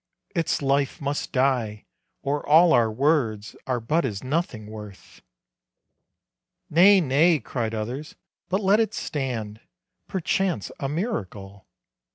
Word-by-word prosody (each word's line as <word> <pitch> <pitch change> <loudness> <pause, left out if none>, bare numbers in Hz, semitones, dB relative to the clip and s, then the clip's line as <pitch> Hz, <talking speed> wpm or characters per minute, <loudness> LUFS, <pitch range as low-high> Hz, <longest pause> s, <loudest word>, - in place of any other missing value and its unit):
Its 165 -4 -1
life 140 0 +1
must 140 0 -3
die 125 -6 0 0.4
or 145 +1 -1
all 165 +3 +7
our 115 -2 +3
words 115 -5 0
Are 125 -2 0
but 150 +9 0
as 105 -7 -3
nothing 130 -6 -2
worth." 105 -2 -11 1.5
"Nay, 190 +5 +7
nay," 160 +2 +3
cried 115 -1 -3
others, 125 +8 -5 0.3
"but 190 +3 0
let 200 +2 +4
it 225 - 0
stand, 115 -7 -4 0.5
Perchance 190 0 -1
a 135 - -2
miracle." 100 - -5
135 Hz, 120 wpm, -24 LUFS, 110-165 Hz, 1.5 s, all